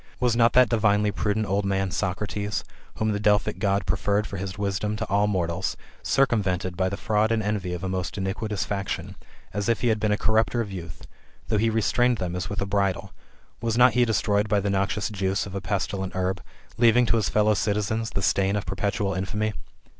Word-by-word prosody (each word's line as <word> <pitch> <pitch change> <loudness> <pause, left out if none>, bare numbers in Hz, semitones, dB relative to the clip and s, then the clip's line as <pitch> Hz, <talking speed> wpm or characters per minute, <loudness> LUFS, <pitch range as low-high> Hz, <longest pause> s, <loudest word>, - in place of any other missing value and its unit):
Was 125 -2 +2
not 115 0 +4
that 125 -1 +6
divinely 105 -2 +2
prudent 105 +2 -1
old 100 +1 0
man 95 -1 0
[Socratws], 100 +3 -2 0.3
whom 110 0 0
the 105 - -1
Delphic 105 0 +2
God 100 -2 +1
preferred 100 +5 0
for 100 - -6
his 95 0 -5
wisdom 100 +1 -1
to - - -3
all 100 +2 +3
mortals, 85 -5 -1 0.2
circumvented 95 -9 +1
by 95 +1 +1
the 100 - -4
fraud 110 0 +1
and 110 -1 +1
envy 100 -3 -2
of 90 +1 -5
a - - -1
most 95 +1 -3
iniquitous 100 +1 -2
faction, 100 -2 -4 0.4
as 105 +2 -1
if 115 - +1
he 120 - +2
had 110 -1 +1
been 105 0 +1
a 105 - +2
corrupter 110 +3 +1
of 105 -4 -2
youth, 85 -3 -8 0.4
though 110 -2 +2
he 115 +2 +2
restrained 120 +2 +2
them 90 -2 -3
as 90 -3 -3
with 100 -1 -3
a - - -3
bridle; 95 -1 -1 0.5
was 115 0 -1
not 125 -1 +6
he 125 +1 +4
des 115 -2 +1
troyed 105 0 +1
by 105 -1 +2
the 100 0 -1
noxious 100 +1 0
juice 95 -1 -1
of 100 - -9
a 100 - -3
pestilent 95 -1 -2
herb, 95 0 -1 0.4
leaving 120 +1 +5
to 115 - +2
his 110 - 0
fellow 105 0 +3
citizens 105 +2 -1
the 100 - -3
stain 100 +1 +2
of 105 - -2
perpetual 100 +1 -1
infamy 105 +3 -2
105 Hz, 210 wpm, -25 LUFS, 95-110 Hz, 0.5 s, that